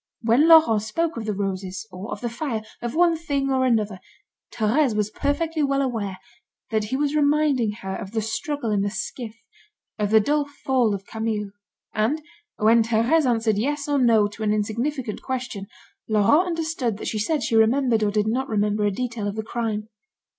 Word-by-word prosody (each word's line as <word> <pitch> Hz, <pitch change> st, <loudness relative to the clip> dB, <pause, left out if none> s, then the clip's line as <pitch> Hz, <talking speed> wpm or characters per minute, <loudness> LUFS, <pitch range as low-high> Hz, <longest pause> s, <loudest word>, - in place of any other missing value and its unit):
When 240 Hz, +7 st, +4 dB
Laurent 315 Hz, -10 st, +7 dB
spoke 315 Hz, +10 st, -2 dB
of 230 Hz, -2 st, -5 dB
the 210 Hz, -, -1 dB
roses, 190 Hz, 0 st, -4 dB
or 185 Hz, +4 st, -8 dB
of -, -, -5 dB
the 240 Hz, -, -2 dB
fire, 230 Hz, -2 st, -3 dB, 0.2 s
of 240 Hz, +2 st, -4 dB
one 340 Hz, 0 st, +4 dB
thing 280 Hz, -4 st, -1 dB
or 260 Hz, -1 st, +2 dB
another, 215 Hz, -5 st, 0 dB, 0.5 s
Thérèse 240 Hz, +3 st, +1 dB
was 210 Hz, 0 st, 0 dB
perfectly 315 Hz, +4 st, -1 dB
well 275 Hz, -1 st, +1 dB
aware 215 Hz, -7 st, -3 dB, 0.5 s
that 215 Hz, -1 st, +1 dB
he 255 Hz, +5 st, -2 dB
was 290 Hz, +1 st, 0 dB
reminding 290 Hz, -6 st, +2 dB
her 190 Hz, 0 st, -3 dB
of 195 Hz, -, -6 dB
the 220 Hz, +1 st, -2 dB
struggle 240 Hz, +2 st, -3 dB
in 205 Hz, -1 st, +1 dB
the 205 Hz, -, 0 dB
skiff, 215 Hz, +3 st, -5 dB, 0.6 s
of 205 Hz, -1 st, 0 dB
the 220 Hz, +1 st, +6 dB
dull 290 Hz, +7 st, +1 dB, 0.2 s
fall 250 Hz, -6 st, +2 dB
of 195 Hz, 0 st, -8 dB
Camille; 220 Hz, -2 st, -3 dB, 0.4 s
and, 225 Hz, +9 st, +1 dB, 0.4 s
when 225 Hz, +2 st, +5 dB
Thérèse 235 Hz, +7 st, +2 dB
answered 225 Hz, -3 st, +1 dB
yes 285 Hz, +5 st, -1 dB
or 290 Hz, -1 st, +1 dB
no 225 Hz, -4 st, +4 dB
to 215 Hz, -, -12 dB
an 215 Hz, -1 st, +1 dB
insignificant 230 Hz, +3 st, -2 dB
question, 245 Hz, -6 st, -4 dB, 0.4 s
Laurent 220 Hz, -, +4 dB
understood 320 Hz, -, -2 dB
that -, -, -6 dB
she 215 Hz, -, -2 dB
said 280 Hz, +6 st, 0 dB
she 225 Hz, -, 0 dB
remembered 230 Hz, +1 st, +3 dB
or 210 Hz, -, +2 dB
did 210 Hz, 0 st, +1 dB
not 255 Hz, +5 st, -1 dB
remember 210 Hz, -1 st, +1 dB
a 205 Hz, -, +2 dB
detail 230 Hz, -1 st, -3 dB
of 200 Hz, -, -3 dB
the 220 Hz, -, -3 dB
crime. 220 Hz, -2 st, -3 dB
225 Hz, 190 wpm, -24 LUFS, 210-275 Hz, 0.6 s, Laurent